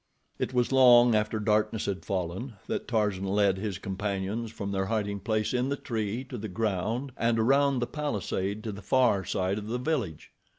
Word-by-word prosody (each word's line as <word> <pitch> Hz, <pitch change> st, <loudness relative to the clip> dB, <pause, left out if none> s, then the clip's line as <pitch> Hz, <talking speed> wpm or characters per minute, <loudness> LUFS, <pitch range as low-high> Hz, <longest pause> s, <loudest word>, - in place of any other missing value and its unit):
It -, -, -1 dB
was 125 Hz, -1 st, +1 dB
long 125 Hz, -2 st, +7 dB
after 105 Hz, +1 st, +1 dB
darkness 105 Hz, +1 st, +1 dB
had 95 Hz, -1 st, -3 dB
fallen, 95 Hz, +6 st, -3 dB
that -, -, -3 dB
Tarzan 105 Hz, -5 st, 0 dB
led 100 Hz, -1 st, +2 dB
his 100 Hz, -3 st, -3 dB
companions 100 Hz, +4 st, -3 dB
from 100 Hz, -2 st, -5 dB
their 95 Hz, -1 st, -1 dB
hiding 100 Hz, -2 st, -1 dB
place 110 Hz, +2 st, -1 dB
in 125 Hz, +1 st, +1 dB
the 140 Hz, -, 0 dB
tree 110 Hz, 0 st, -3 dB
to 125 Hz, -2 st, -7 dB
the 110 Hz, -, -4 dB
ground 110 Hz, +6 st, -2 dB
and 115 Hz, 0 st, +1 dB
around 135 Hz, +4 st, +3 dB
the 120 Hz, -, 0 dB
palisade 105 Hz, -, -3 dB
to 110 Hz, -, -3 dB
the 100 Hz, 0 st, -8 dB
far 120 Hz, -3 st, +3 dB
side 95 Hz, +2 st, -1 dB
of 105 Hz, -, -8 dB
the 120 Hz, +3 st, -1 dB
village. 125 Hz, -, -3 dB
110 Hz, 185 wpm, -28 LUFS, 100-120 Hz, -, long